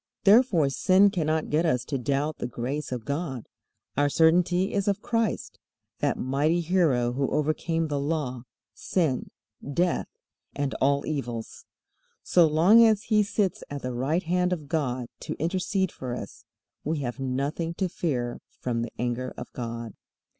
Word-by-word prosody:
Therefore 205 Hz, -, +5 dB
sin 190 Hz, +7 st, +4 dB
cannot 160 Hz, -4 st, -1 dB
get 155 Hz, +3 st, +3 dB
us 125 Hz, -7 st, +1 dB
to 140 Hz, -3 st, -2 dB
doubt 145 Hz, +4 st, -1 dB
the -, -, -2 dB
grace 130 Hz, +5 st, -4 dB
of 120 Hz, -3 st, -4 dB
God. 140 Hz, -5 st, -3 dB, 0.5 s
Our 145 Hz, +1 st, +3 dB
certainty 175 Hz, +4 st, +3 dB
is 200 Hz, -1 st, 0 dB
of 200 Hz, +1 st, 0 dB
Christ, 230 Hz, -5 st, -1 dB, 0.4 s
that -, -, 0 dB
mighty 145 Hz, +6 st, +1 dB
Hero 155 Hz, -9 st, +2 dB
who 135 Hz, +1 st, 0 dB
overcame 160 Hz, +2 st, 0 dB
the 145 Hz, -2 st, -1 dB
Law, 140 Hz, -5 st, -2 dB, 0.3 s
sin, 155 Hz, -9 st, -1 dB, 0.3 s
death, 170 Hz, +5 st, 0 dB, 0.5 s
and 140 Hz, -1 st, -1 dB
all 140 Hz, +1 st, +2 dB
evils. 120 Hz, -7 st, -4 dB, 0.6 s
So 175 Hz, -2 st, +5 dB
long 175 Hz, +10 st, +6 dB
as 215 Hz, -2 st, +4 dB
He 215 Hz, -1 st, +3 dB
sits 200 Hz, -2 st, -1 dB
at 145 Hz, -1 st, -6 dB
the 125 Hz, 0 st, -3 dB
right 145 Hz, +9 st, 0 dB
hand 180 Hz, +2 st, +1 dB
of 155 Hz, -5 st, -3 dB
God 130 Hz, -6 st, -1 dB
to -, -, -5 dB
intercede 185 Hz, +3 st, 0 dB
for 125 Hz, -2 st, -5 dB
us, 115 Hz, 0 st, -9 dB, 0.4 s
we 155 Hz, -1 st, -1 dB
have 125 Hz, 0 st, -4 dB
nothing 140 Hz, +6 st, -2 dB
to 190 Hz, -, 0 dB
fear 130 Hz, -9 st, -2 dB, 0.2 s
from 120 Hz, -2 st, -1 dB
the 120 Hz, -, -4 dB
anger 125 Hz, +1 st, -2 dB
of 125 Hz, -, -8 dB
God. 115 Hz, -2 st, -5 dB
150 Hz, 155 wpm, -26 LUFS, 130-175 Hz, 0.6 s, long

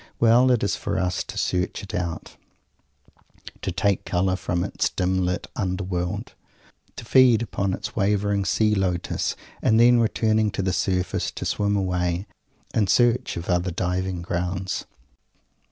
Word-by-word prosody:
Well! 120 Hz, +2 st, +5 dB
It 125 Hz, -3 st, +2 dB
is 100 Hz, -, +1 dB
for 100 Hz, -2 st, -3 dB
us 90 Hz, -2 st, 0 dB
to -, -, -8 dB
search 90 Hz, +2 st, -1 dB
it 100 Hz, -, -9 dB
out; 85 Hz, -2 st, -4 dB, 1.3 s
to -, -, -2 dB
take 100 Hz, -2 st, 0 dB
colour 95 Hz, +1 st, 0 dB
from 90 Hz, -1 st, -2 dB
its -, -, -1 dB
dim 95 Hz, 0 st, 0 dB
lit 90 Hz, 0 st, -1 dB
under 95 Hz, -1 st, -2 dB
world; 90 Hz, -1 st, -3 dB, 0.6 s
to 120 Hz, -, -8 dB
feed 125 Hz, -3 st, +5 dB
upon 100 Hz, -3 st, -2 dB
its -, -, -7 dB
wavering 100 Hz, -1 st, +1 dB
Sea 105 Hz, +3 st, +2 dB
Lotus 90 Hz, -3 st, -1 dB, 0.3 s
and 110 Hz, 0 st, +3 dB
then, 120 Hz, +1 st, +6 dB
returning 110 Hz, -1 st, +2 dB
to 95 Hz, -, -2 dB
the 95 Hz, -1 st, 0 dB
surface, 90 Hz, 0 st, 0 dB
to -, -, -6 dB
swim 105 Hz, 0 st, 0 dB
away, 90 Hz, -1 st, -1 dB, 0.5 s
in 105 Hz, -3 st, +2 dB
search 120 Hz, +3 st, +2 dB
of 85 Hz, -, -5 dB
other 90 Hz, 0 st, +1 dB
diving 90 Hz, +1 st, -2 dB
grounds! 90 Hz, +2 st, -3 dB
95 Hz, 155 wpm, -24 LUFS, 90-105 Hz, 1.3 s, then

